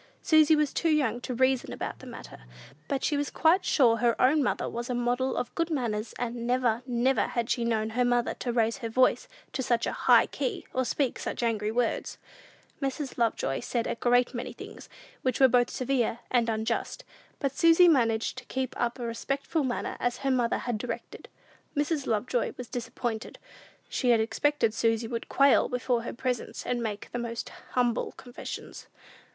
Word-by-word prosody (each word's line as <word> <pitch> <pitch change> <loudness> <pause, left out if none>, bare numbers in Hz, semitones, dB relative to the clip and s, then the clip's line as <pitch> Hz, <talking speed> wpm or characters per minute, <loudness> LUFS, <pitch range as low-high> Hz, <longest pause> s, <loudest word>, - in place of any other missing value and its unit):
Susy 315 -1 +6
was 300 -2 +1
too 335 - +1
young 260 -7 +1
to 250 - -4
reason 260 0 +2
about - - -5
the - - -11
matter; - - -10 0.4
but 275 -1 -2
she 300 - +1
was 290 0 -1
quite 345 +4 +3
sure 235 -5 +4
her 235 0 +1
own 290 +4 +4
mother 265 - 0
was 240 +1 -5
a 250 - -1
model 245 +2 0
of 245 - -3
good 335 0 -1
manners; 230 -7 -2
and 235 -1 -3
never, 245 -2 +1
never 250 +2 +2
had 235 -2 -2
she 240 - +1
known 220 -2 0
her 250 +2 +1
mother 245 -1 +1
to 245 - -3
raise 230 -1 +1
her 230 -4 -5
voice 255 +3 +2 0.3
to - - -1
such 240 -2 +1
a - - -1
high - - +5
key, 430 -7 -3
or 260 - +1
speak 270 0 -1
such - - -4
angry 215 -2 0
words! 240 0 -1 0.6
Mrs. 270 -1 -3
Lovejoy 215 - 0
said 235 -2 -2
a - - -1
great 245 +1 +2
many 250 +1 -5
things - - -11 0.3
which 255 -2 0
were 265 - +8
both 245 -1 +3
severe 255 -3 0
and 235 -2 +2
unjust; 220 +1 -2 0.3
but 275 -2 -2
Susy 335 +4 +6
managed 235 -6 +2
to 250 - -15
keep 260 +1 -3
up 240 +1 0
a 245 - -4
respectful 275 +6 -2
manner, 250 -2 -2
as 245 0 -1
her 270 - +3
mother 245 -3 +1
had 240 -3 -3
directed. 245 - -6 0.5
Mrs. 290 -1 0
Lovejoy 235 +2 0
was 250 - -7
disappointed. 235 -1 -4 0.5
She 250 - -1
had 235 -2 +5
expected 235 +1 +1
Susy 225 0 +1
would 230 0 -5
quail 275 -1 +4
before 250 -1 0
her 235 - -5
presence 250 0 -3
and 245 -1 -1
make 215 -3 -4
the 245 - -3
most 235 -1 -4 0.3
humble 245 -2 +1
confessions. 245 -1 -8
245 Hz, 185 wpm, -28 LUFS, 230-265 Hz, 0.6 s, were